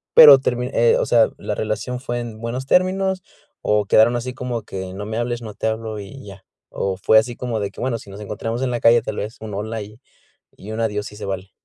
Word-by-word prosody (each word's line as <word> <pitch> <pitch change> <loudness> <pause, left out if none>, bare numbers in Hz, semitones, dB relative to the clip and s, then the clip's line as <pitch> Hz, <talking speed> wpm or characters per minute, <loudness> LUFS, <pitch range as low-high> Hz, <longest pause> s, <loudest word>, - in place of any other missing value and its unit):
Pero, 145 -3 +11
termi 125 -1 -1
eh, 115 0 +4
o - - +1
sea, 115 -2 +4
¿la - - -4
relación 115 +4 -3
fue 120 -2 -3
en 115 -2 -7
buenos 120 +3 -4
términos? 185 +4 +2 0.4
¿O 105 -1 +1
quedaron 110 +4 +5
así 125 +1 -3
como 125 -3 -4
que, 95 -2 -6
no 100 +2 -6
me 110 +1 -4
hables, 120 0 -2
no 110 -2 -7
te 110 - -3
hablo 110 -1 -3
y 105 +5 -10
ya? 95 -1 -12 0.3
¿O 95 -1 -2
fue 110 +3 +4
así 120 +2 -3
como 120 -3 -3
de 100 -1 -2
que, - - -10
bueno, 125 -2 -1
si - - -14
nos 100 +1 -10
encontramos 115 +3 -4
en 130 - 0
la 120 - -1
calle, 115 0 +5
tal 110 -1 -5
vez 105 +3 -5
un 110 -1 -7
hola 110 +2 -4
y 105 +3 -11 0.6
y 105 +3 -9
un 110 - -3
adiós 105 -2 -1
sí - - -9
se 105 - -7
vale? 95 0 -5
110 Hz, 245 wpm, -21 LUFS, 105-120 Hz, 0.6 s, Pero